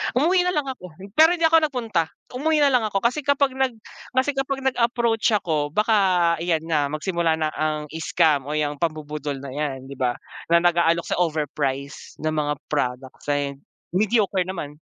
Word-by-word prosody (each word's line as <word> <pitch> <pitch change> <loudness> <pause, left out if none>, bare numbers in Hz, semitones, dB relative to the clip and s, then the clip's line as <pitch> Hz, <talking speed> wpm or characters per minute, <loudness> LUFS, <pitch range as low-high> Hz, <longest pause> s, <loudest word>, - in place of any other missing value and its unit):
Umuwi 355 +7 +3
nalang 305 -5 +1
ako 180 -10 -8 0.3
pero 320 +2 +7
hindi 335 - -4
ako 325 0 +6
napunta. 225 - -1 0.2
Umuwi 300 +4 +1
nalang 250 -6 +3
ako 195 -1 -1
kasi 250 +6 +2
kapag 280 -1 +3
nag 265 -3 +1 0.4
kasi 260 +3 +2
kapag 270 0 -3
nag-approach 235 -3 +1
ako, 155 -6 0
baka 190 -6 +3
iyan 165 -2 0
na 155 -3 +1
magsimula 165 +2 0
na 155 -1 -1
ang 155 -1 -1
scam 160 -3 +1
o 150 - -2
‘yang 145 -1 -1
pabubudol 150 -3 -3
na 140 - -7
yan, 135 -2 -4
‘di - - -7
ba, 125 -1 +1 0.4
na 170 - +7
nag-aalok 170 -1 +3
sa - - -1
overprice 145 -4 -2
ng 155 - +1
mga 150 -1 0 0.2
product, 130 -2 -2
eh, 140 -1 -1 0.4
mediocre 200 -2 +1
naman. 150 -5 -6
170 Hz, 165 wpm, -23 LUFS, 150-240 Hz, 0.4 s, pero